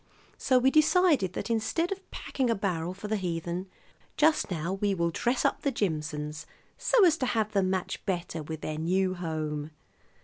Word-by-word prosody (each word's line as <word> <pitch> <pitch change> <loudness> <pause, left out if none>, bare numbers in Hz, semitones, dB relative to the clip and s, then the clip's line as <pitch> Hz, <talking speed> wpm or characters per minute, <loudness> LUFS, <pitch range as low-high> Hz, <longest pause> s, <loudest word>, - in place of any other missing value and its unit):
So 260 - +3
we 260 +2 +4
decided 310 - +4
that 235 - -3
instead 230 - 0
of 390 0 -6
packing 260 -3 -2
a 230 - +3
barrel 180 -3 -2
for 200 +2 -7
the 215 0 0
heathen 175 0 -3 0.5
just 305 -3 +3
now 170 0 -2
we 195 0 0
will 170 -1 0
dress 240 +8 0
up - - +1
the 280 - +1
Jimson's, 150 - -3 0.3
so 460 -6 +4
as 330 -2 +4
to 255 - -1
have 220 -3 0
them 195 -3 +2
match 185 -1 -2
better 175 -3 -2
with 155 +1 -6
their 155 0 -4
new 185 +3 +1
home. 155 -4 -3
190 Hz, 180 wpm, -28 LUFS, 165-245 Hz, 0.5 s, we